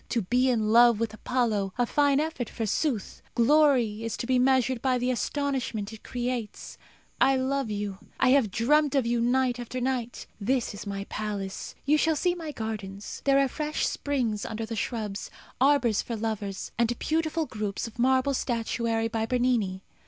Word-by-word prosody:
To 230 -4 0
be 250 +7 +2
in 220 -4 +1
love 235 0 +6
with 225 -1 -1
Apollo 215 -5 -1
a 245 - +3
fine 285 +2 +3
effort, 300 -7 -2
forsooth! 225 +1 -2
Glory 245 -4 +3
is 230 - -3
to - - -4
be 255 0 +2
measured 260 -1 +2
by 260 -1 +2
the 250 +1 0
astonishment 250 -4 -2
it 220 - -11
creates. 245 -3 -4 0.4
I 270 - +5
love 265 -1 0
you. 205 -2 -3 0.2
I - - +4
have 260 -5 +4
dreamt 290 +8 +2
of 270 -3 +2
you 235 0 +1
night 245 0 +1
after 245 +1 -5
night. 245 -2 -2
This 240 +3 0
is 205 +1 -8
my 200 0 -3
palace. 200 -2 -5
You 300 +2 +4
shall 320 +1 +2
see 355 +4 +1
my 330 -3 -6
gardens. 210 -5 -6
There 275 -1 +5
are 275 0 +4
fresh 300 +3 -2
springs 245 -8 -1
under 220 +1 -4
the 225 +1 -5
shrubs; 215 -3 -3 0.3
arbours 260 -6 +4
for 235 - -5
lovers; 210 -3 -4
and 235 0 +2
beautiful 320 0 0
groups 210 -5 -4
of 230 0 -10
marble 260 +2 +3
statuary 230 -2 -1
by 225 -1 -2
Bernini. 235 -7 0
240 Hz, 175 wpm, -27 LUFS, 220-265 Hz, 0.4 s, love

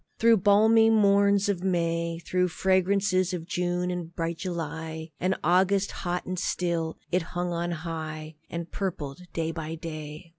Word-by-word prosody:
Through 230 0 +5
balmy 220 +3 +5
morns 200 -2 +4
of 190 -3 -1
May; 170 -2 0
Through 180 0 +1
fragrances 185 +1 +2
of 165 -2 -6
June 180 0 -1
and 175 -1 -5
bright 165 -1 -2
July, 160 -2 -5
And 185 +2 +1
August, 190 +3 +3
hot 180 -1 -3
and 185 -1 -3
still, 170 -3 -1
it 180 +1 +2
hung 175 +2 -3
on 170 +1 -1
high 155 -2 -5 0.2
And 170 0 -5
purpled 160 -8 -4
day 165 -1 -2
by 160 0 -5
day. 155 0 -7
175 Hz, 150 wpm, -27 LUFS, 165-190 Hz, 0.2 s, Through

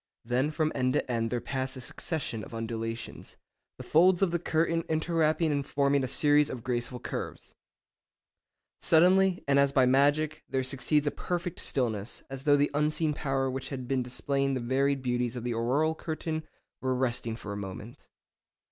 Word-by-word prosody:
Then 125 +4 +1
from 155 0 0
end 130 0 +1
to - - 0
end 115 -1 0
there 120 - -1
pass 130 +1 -3
a - - -7
succession 125 -3 -3
of - - -9
undulations, 115 0 -5 0.4
the - - -8
folds 180 +3 +4
of 185 - +2
the 170 - 0
curtain 165 0 +1
interwrapping 160 0 +1
and 140 -1 0
forming 140 0 +1
a - - -1
series 150 +2 +3
of 120 -3 -6
graceful 125 0 -2
curves. - - -6 1.3
Suddenly, 180 +3 +4
and 140 0 +4
as 140 0 +4
by 130 -2 +4
magic, 145 +4 +2
there 130 -1 0
succeeds 135 +3 +1
a 145 - +1
perfect 175 -1 -4
stillness, 115 -4 -1
as 135 +1 -7
though 145 -1 +5
the 145 0 +2
unseen 150 +1 +1
power 135 -2 -1
which 130 0 -4
had 130 -3 -5
been 135 -1 +1
displaying 135 +2 -1
the - - -1
varied 135 +2 0
beauties 125 -1 -1
of 120 - -5
the 120 -1 -1
auroral 130 +8 +1
curtain 160 0 -4 0.3
were 130 0 0
resting 120 -3 -1
for 105 -3 -7
a - - -5
moment. 100 +6 -8
135 Hz, 175 wpm, -29 LUFS, 125-155 Hz, 1.3 s, though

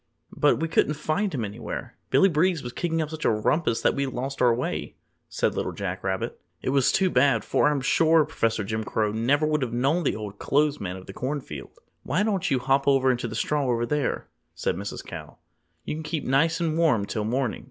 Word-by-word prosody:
"But 145 - +3
we 165 - 0
couldn't 155 -2 +2
find 155 +7 -1
him 125 -7 -2
anywhere. 100 - -6
Billy 195 - +5
Breeze 170 -1 +1
was 120 0 -6
kicking 165 -2 -1
up 155 - -7
such 160 -1 -6
a - - +4
rumpus 115 +3 +1
that - - +3
we 140 0 -1
lost 135 +1 -4
our 125 -1 +6
way," 120 +2 -2 0.3
said - - 0
Little - - -2
Jack - - -4
Rabbit. 95 -1 -3 0.2
"It - - -3
was 135 -2 +3
too 190 -2 +2
bad, 125 -3 +3
for - - +3
I'm 145 -2 0
sure 160 +3 +4
Professor 115 -8 0
Jim 110 +2 -2
Crow 105 0 0
never 130 +8 +2
would 150 -1 +1
have 120 -3 -2
known 135 +8 +2
the - - 0
Old 105 -2 -7
Clothes 150 +1 +1
Man 90 -2 -4
of 95 0 -10
the 95 - -9
Corn 140 +7 -2
Field!" 75 - -9 0.2
"Why 175 +8 0
don't 205 -4 0
you 135 - +2
hop 135 +2 +1
into 130 -3 +3
the - - -6
straw 145 -2 0
over 120 -1 +1
there," 145 +1 -1 0.3
said - - -1
Mrs. 100 +3 -6
Cow. - - -9 0.5
"You - - -3
can - - -5
keep 155 0 -3
nice 145 +7 +2
and 165 -2 0
warm 130 -12 +3
till 105 +1 -3
morning. 120 +2 -1
135 Hz, 220 wpm, -26 LUFS, 115-155 Hz, 0.5 s, our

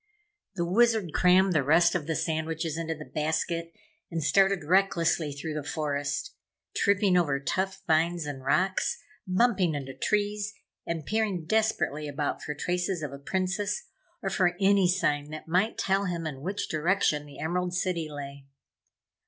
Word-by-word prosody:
The 170 -2 0
Wizard 215 -2 +2
crammed 185 +1 +4
the 155 - +3
rest 165 +5 +4
of 160 -4 -2
the 160 - -1
sandwiches 160 0 -2
into 165 0 -3
the 150 0 -9
basket 165 +2 -2 0.4
and 165 -2 -3
started 195 +2 +3
recklessly 170 -3 +2
through 150 +3 -5
the 150 - -3
forest, 145 - -2 0.4
tripping 200 -2 +3
over 145 -6 +2
tough 190 +6 -2
vines 165 0 +2
and 140 -3 -6
rocks, 185 +7 +1 0.3
bumping 185 -4 +2
into 135 -2 -5
trees 210 +7 -1 0.3
and 165 -3 -3
peering 210 -6 -1
desperately 185 -7 0
about 145 0 -2
for 150 - -4
traces 180 +1 -1
of 145 - -4
a 140 - -8
Princess, 190 - -1 0.4
or 195 - -1
for 180 -2 +2
any 195 -1 +4
sign 150 -5 +1
that 155 +1 -8
might 185 +7 +1
tell 195 +1 +1
him 170 -3 -3
in 140 -4 -5
which 195 +6 -3
direction 155 -2 +1
the 145 - -12
Emerald 180 +2 -1
City 175 -4 -1
lay. 140 -1 -8
170 Hz, 155 wpm, -28 LUFS, 150-190 Hz, 0.4 s, crammed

